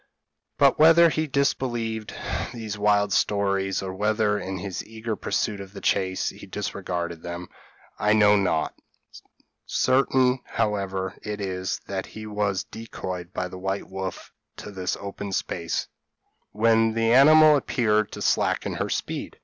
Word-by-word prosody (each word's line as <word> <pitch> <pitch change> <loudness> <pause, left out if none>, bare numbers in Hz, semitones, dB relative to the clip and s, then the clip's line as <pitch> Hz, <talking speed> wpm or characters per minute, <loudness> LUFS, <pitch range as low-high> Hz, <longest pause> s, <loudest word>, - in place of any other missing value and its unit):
But, - - +4
whether 165 +2 +7
he 155 0 -1
disbelieved 120 -5 -1 0.4
these 110 -3 -5
wild 105 -1 +2
stories, 100 -2 +1
or 95 -1 -4
whether, 105 +1 +1
in 95 -1 -4
his 95 0 -5
eager 110 0 -5
pursuit 105 -1 -2
of 100 0 -11
the 100 - -8
chase, 95 -1 0
he - - -11
disregarded 90 -4 -4
them, 85 0 -6 0.5
I 105 +1 +3
know 105 -1 +6
not; 90 -6 +1 0.9
certain, 130 -1 +2
however, 95 -4 -2
it 105 0 -5
is, 95 -2 -3
that 95 -1 -4
he 110 0 -9
was 105 -2 -1
decoyed 90 -5 -7
by 90 -1 -3
the 90 0 -9
white 95 +1 -3
wolf 95 -1 -6 0.2
to 105 - -8
this 95 -2 -3
open 100 0 -6
space, 85 -3 -2 0.6
when 115 +1 +3
the 115 0 +2
animal 155 +3 +8
appeared 110 -6 +1
to - - -5
slacken - - +1
her - - -2
speed. - - -4
105 Hz, 140 wpm, -25 LUFS, 95-115 Hz, 0.9 s, animal